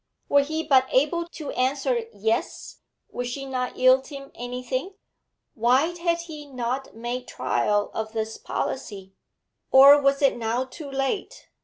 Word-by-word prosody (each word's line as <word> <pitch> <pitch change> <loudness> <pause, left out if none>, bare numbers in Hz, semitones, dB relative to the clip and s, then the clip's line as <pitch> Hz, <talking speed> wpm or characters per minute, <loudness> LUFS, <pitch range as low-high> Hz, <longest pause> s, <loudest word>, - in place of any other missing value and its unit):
Were 285 - +5
he 315 +3 -3
but 260 -3 +4
able 320 +6 +1
to 315 -3 -7
answer 260 -2 0
'Yes,' 220 +2 -2 0.3
would 245 - -4
she 275 +3 -5
not 255 -2 -3
yield 255 +1 +4
him 275 -2 -9
anything? 250 +8 -4 0.6
Why 255 +9 +2
had 340 0 0
he 305 -3 -9
not 255 -1 -4
made 240 +2 -5
trial 205 0 0
of 220 0 -4
this 220 0 -3
policy? 195 -6 -5 0.6
Or 280 +2 +8
was 275 +1 +2
it 275 - +3
now 235 +2 -1
too 280 +3 -10
late? 270 +8 -3
260 Hz, 145 wpm, -25 LUFS, 240-285 Hz, 0.6 s, Or